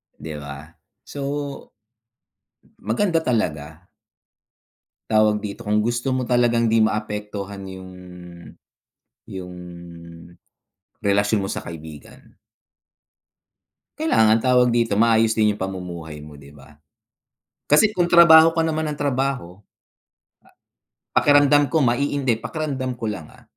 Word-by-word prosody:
'Di 80 -1 -8
ba? 70 +2 -10 0.3
So, 145 - -10 1.6
maganda 165 - 0
talaga. 80 - -3 1.2
Tawag 110 -1 +3
dito, 105 +2 -7
kung 105 0 +1
gusto 120 +4 -1
mo 130 -1 -2
talagang 120 -1 +2
'di 110 0 +3
maapektuhan 105 -2 -4
yung 95 -1 -10 1.3
yung 90 -1 -9 1.5
relasyon 100 +1 +2
mo - - -5
sa - - -5
kaibigan 80 -3 -12 1.6
kailangan 110 - +3
tawag 125 +1 +3
dito, 115 -2 +1
maayos 115 +1 +3
din 105 -2 +1
yung - - -13
pamumuhay 85 -5 -6
mo, 75 -1 -12
'di 70 0 -15
ba? 75 +1 -18 0.9
Kasi 150 +9 +6
kung 175 -1 0
trabaho 165 -1 +8
ka 165 - -3
naman 160 0 -2
ng 150 - -8
trabaho, 135 -9 -2 1.6
a - - +2
pakiramdam 145 0 +4
ko 150 +4 0
maiin 140 +3 0
'di, 120 -4 +1
pakiramdam 135 -1 -4
ko 115 -3 -4
lang, 85 -7 -7
ah, - - -19
110 Hz, 115 wpm, -21 LUFS, 95-130 Hz, 1.6 s, trabaho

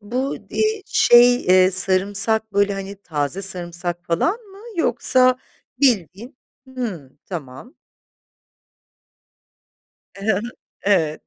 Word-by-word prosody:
Bu, 250 +6 -3
di 435 -2 -1
şey, 245 +1 +5
eee, 185 0 +5
sarımsak 200 +3 +2
böyle, 200 0 +1
hani, 195 0 -7
taze 150 +3 -3
sarımsak 175 -2 -4
falan 170 - 0
mı 395 -4 -17 0.2
yoksa 255 -3 +2 0.4
bildiğin, 235 - 0 0.3
hımm, 195 - -7
tamam. 155 - -9 2.4
Hı 195 - -9
hı. - - -2 0.4
Evet, 160 -7 0
200 Hz, 95 wpm, -20 LUFS, 175-245 Hz, 2.4 s, şey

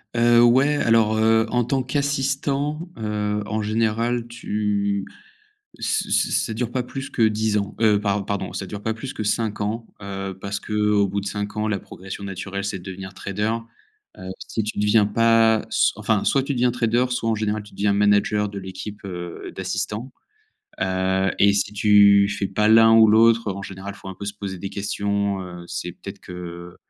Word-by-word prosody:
Heu, 120 0 +5
ouais, 130 +5 +4
alors 115 -5 +3
heu, 110 0 +4
en 120 0 +2
tant 130 +2 0
qu'assistant, 140 +3 -1
heu, 105 -1 -2
en 110 +1 -2
général, 115 +2 0
tu 105 -4 -2 0.7
ç - - 0
ç - - +2
ça 115 - +1
dure 120 +1 -2
pas 130 - -1
plus 135 +3 -7
que - - -2
10 110 -1 +2
ans, 100 -1 -3
heu, 105 -2 +3
par 100 -1 0
pardon, 100 -1 -3
ça 95 - -4
dure 100 +2 -7
pas 110 +1 -2
plus 130 +4 -7
que - - -5
5 105 0 -1
ans, 110 +3 -2 0.2
heu, 95 -1 -5
parce 100 0 -3
qu'au 105 -1 +1
bout 100 +1 -2
de 100 - -5
5 105 +1 -4
ans 105 0 0
la 105 -2 0
progression 95 +1 -9
naturelle 95 0 -5
c'est 100 -1 -3
de - - -14
devenir 95 0 -8
trader, 105 +4 -2 0.6
heu, 95 0 -8 0.2
si 110 - -2
tu 105 - -4
deviens 105 +1 +4
pas 115 0 +4
s - - +3
enfin - - 0
soit 135 - +2
tu 140 +1 -3
deviens 125 0 +2
trader, 120 0 +1
soit, 115 -2 -1
en 110 - +2
général, 105 0 -1
tu 105 -1 -15
deviens 100 0 +1
manager 105 +1 +2
de 100 - -8
l'équipe, 95 +2 -7
heu, 90 -2 -7
d'assistants, 100 +6 -3 0.7
heu, 95 0 +1
et 100 - +6
si 100 +1 0
tu 100 -1 +5
fais 100 -1 -2
pas 105 +2 +1
l'un 115 +1 +7
ou 110 -1 +7
l'autre, 115 +1 +4
heu, - - -2
en 100 - -6
général, 95 +1 -7
faut - - -12
un 95 - -5
peu 100 - -8
se 100 +1 -5
poser 100 -3 -6
des 95 - -5
questions, 100 0 -1
heu, 90 -1 -9
c'est 90 0 -5
peut-être - - -10
que 85 -1 -9
105 Hz, 195 wpm, -23 LUFS, 100-115 Hz, 0.7 s, l'un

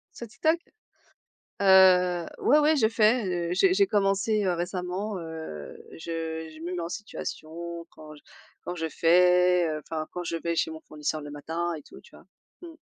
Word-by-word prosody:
Sur 235 - -7
TikTok? 315 +8 +1 1.0
Heu, 180 -3 +5
ouais, 295 - +4
ouais 305 +1 +4
je 220 -5 +3
fais, 225 +1 +3 0.3
heu, - - -1
j'ai 370 - +3
j'ai 400 0 +4
commencé, 205 - +1
heu, 185 - +2
récemment, 180 +3 -3
heu, 160 - -8 0.2
je 160 -1 -5
je 155 - -13
me 180 +2 -4
mets 175 - -3
en 165 - -4
situation 170 -4 -7
quand 155 -1 -13
j 150 - -17 0.4
quand 175 - -5
je 160 -1 -3
fais, 180 +1 +4
heu, 155 -1 -2
enfin, 155 +1 -5
quand 180 0 -5
je 170 - -2
vais 165 +1 -2
chez 160 - +1
mon 160 - -9
fournisseur 155 0 -4
le 145 - -8
matin 165 +4 -3
et 150 - -8
tout - - -14
tu - - -18
vois? - - -17 0.4
Mmh. 340 - -9
175 Hz, 185 wpm, -27 LUFS, 160-195 Hz, 1.0 s, Heu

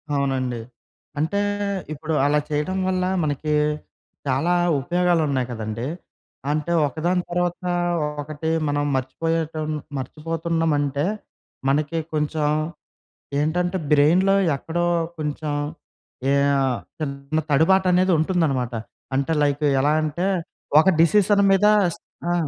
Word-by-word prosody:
అవునండి. 130 -3 -1 0.6
అంటే 200 +7 0 0.5
ఇప్పుడు 155 +2 -4
అలా 150 +1 +3
చేయడం 150 +6 -1
వల్ల, 185 -1 0 0.2
మనకి 150 +1 -1 0.7
చాలా 140 +7 +1 0.3
ఉపయోగాలున్నాయి 160 -6 +1
కదండీ! 110 +2 -4 0.6
అంటే, 155 +3 -1 0.2
ఒకదాని 175 +6 -1
తర్వాత 175 0 0 0.6
ఒకటి 155 +2 -4 0.2
మనం 145 0 0
మర్చిపోయేటం 155 +4 -2 0.3
మర్చిపోతున్నామంటే, 155 0 -1 0.6
మనకి 150 +3 0 0.2
కొంచెం 150 0 0 0.9
ఏంటంటే 175 +4 0
బ్రెయిన్‌లో 170 +7 +5 0.2
ఎక్కడో 175 +5 -2 0.3
కొంచెం 150 0 -3 0.8
ఏ - - +3 0.2
ఆహ్, 130 -3 +1 0.2
చిన్న 140 +1 -3
తడుబాటనేది 185 +4 +4
ఉంటుందన్నమాట. 150 -8 0 0.4
అంటే, 140 +4 +1
లైకు 145 +1 +1
ఎలా 145 +2 +3
అంటే 155 +5 -1 0.5
ఒక 190 - +2
డిసిషన్ 200 +4 +4
మీద 195 +2 +4 0.6
ఆ! - - +2
155 Hz, 95 wpm, -23 LUFS, 145-175 Hz, 0.9 s, బ్రెయిన్‌లో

